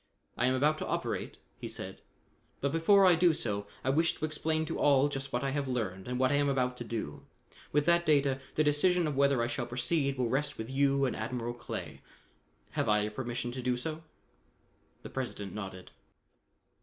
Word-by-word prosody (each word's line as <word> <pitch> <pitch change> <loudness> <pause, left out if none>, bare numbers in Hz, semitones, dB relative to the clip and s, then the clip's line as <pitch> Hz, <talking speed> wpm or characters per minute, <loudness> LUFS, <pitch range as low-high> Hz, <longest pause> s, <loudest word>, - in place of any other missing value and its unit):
"I 120 - +2
am 130 - +2
about 150 +4 +2
to - - -3
operate," - - -2 0.2
he - - -5
said, - - -6 0.6
"but 140 - 0
before 190 +5 +5
I 180 - +7
do 170 -1 +4
so, 100 -5 -3 0.2
I 130 - +2
wish 165 +4 +2
to - - -2
explain 155 +1 -1
to - - -4
all 140 0 +4
just 135 -1 -4
what 120 +2 -1
I 135 - 0
have 140 0 -1
learned 105 -7 -3
and 125 0 -2
what 130 +1 +3
I 145 - +3
am 145 0 +2
about 125 -2 +1
to 120 - -5
do. 110 -11 -5 0.4
With 145 0 +2
that 170 0 +4
data, 140 -4 +3 0.2
the 155 - +3
decision 170 +4 +3
of 150 -2 -1
whether 140 -3 +3
I - - 0
shall 120 0 -3
proceed 135 +3 0
will 125 -2 +1
rest 135 +5 0
with 110 +3 -5
you 140 0 +3
and 130 - -1
Admiral 120 +1 -3
Clay. 120 - -7 0.7
Have - - 0
I 105 0 +4
your 105 +1 -2
permission 120 +1 -3
to 130 +1 -5
do 125 0 0
so?" 155 +5 -4 1.0
The - - -8
President 105 -7 -4
nodded. 95 -3 -7
135 Hz, 205 wpm, -31 LUFS, 120-150 Hz, 1.0 s, I